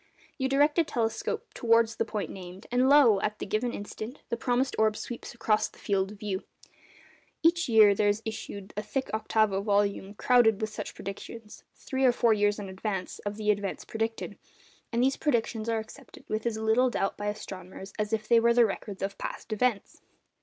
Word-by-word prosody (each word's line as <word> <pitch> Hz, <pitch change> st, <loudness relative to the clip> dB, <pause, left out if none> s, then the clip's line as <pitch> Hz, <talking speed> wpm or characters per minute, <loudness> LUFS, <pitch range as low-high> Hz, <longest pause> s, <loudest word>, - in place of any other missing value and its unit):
You 265 Hz, 0 st, 0 dB
direct 290 Hz, +4 st, +3 dB
a -, -, +5 dB
telescope 225 Hz, -6 st, -2 dB
towards 230 Hz, -1 st, +3 dB
the -, -, +1 dB
point 210 Hz, -2 st, -4 dB
named, 185 Hz, +1 st, -9 dB
and 250 Hz, +2 st, +3 dB
lo! 250 Hz, -9 st, +6 dB
at 210 Hz, 0 st, -1 dB
the -, -, -5 dB
given 215 Hz, +4 st, -1 dB
instant, 215 Hz, +4 st, -7 dB
the -, -, 0 dB
promised 250 Hz, +2 st, 0 dB
orb 215 Hz, -1 st, +3 dB
sweeps 240 Hz, +2 st, -7 dB
across 215 Hz, -2 st, +2 dB
the -, -, -20 dB
field 195 Hz, -1 st, 0 dB
of -, -, -13 dB
view. 200 Hz, -3 st, -3 dB, 1.0 s
Each 335 Hz, -2 st, +3 dB
year 215 Hz, -3 st, +7 dB
there 205 Hz, +1 st, +1 dB
is 205 Hz, +2 st, +1 dB
issued 205 Hz, -2 st, -6 dB
a 210 Hz, -, -1 dB
thick 260 Hz, +6 st, -3 dB
octavo 215 Hz, -2 st, +1 dB
volume 200 Hz, -1 st, 0 dB
crowded 225 Hz, -3 st, +4 dB
with 215 Hz, -1 st, -2 dB
such -, -, -6 dB
predictions, 210 Hz, +3 st, -8 dB
three 265 Hz, -1 st, -3 dB
or 255 Hz, -, +7 dB
four 235 Hz, -1 st, +3 dB
years 205 Hz, -1 st, +2 dB
in 205 Hz, -2 st, -6 dB
advance 190 Hz, 0 st, -4 dB
of 205 Hz, +1 st, -3 dB
the 210 Hz, -1 st, +2 dB
events 200 Hz, -2 st, -3 dB
predicted; 225 Hz, 0 st, -3 dB, 0.5 s
and 235 Hz, +1 st, +1 dB
these 270 Hz, +1 st, +2 dB
predictions 230 Hz, -5 st, 0 dB
are 225 Hz, -, +1 dB
accepted 220 Hz, 0 st, -10 dB
with 215 Hz, +2 st, -2 dB
as 225 Hz, -2 st, -1 dB
little 220 Hz, +4 st, +3 dB
doubt 195 Hz, -4 st, -1 dB
by 205 Hz, -, -4 dB
astronomers 190 Hz, -2 st, -7 dB
as 210 Hz, 0 st, -1 dB
if 215 Hz, -1 st, -1 dB
they 235 Hz, +1 st, +6 dB
were 235 Hz, +1 st, +3 dB
the 240 Hz, -1 st, +6 dB
records 200 Hz, -1 st, -5 dB
of 195 Hz, 0 st, -4 dB
past 220 Hz, -, -5 dB
events. 220 Hz, -1 st, -1 dB
220 Hz, 195 wpm, -28 LUFS, 205-235 Hz, 1.0 s, year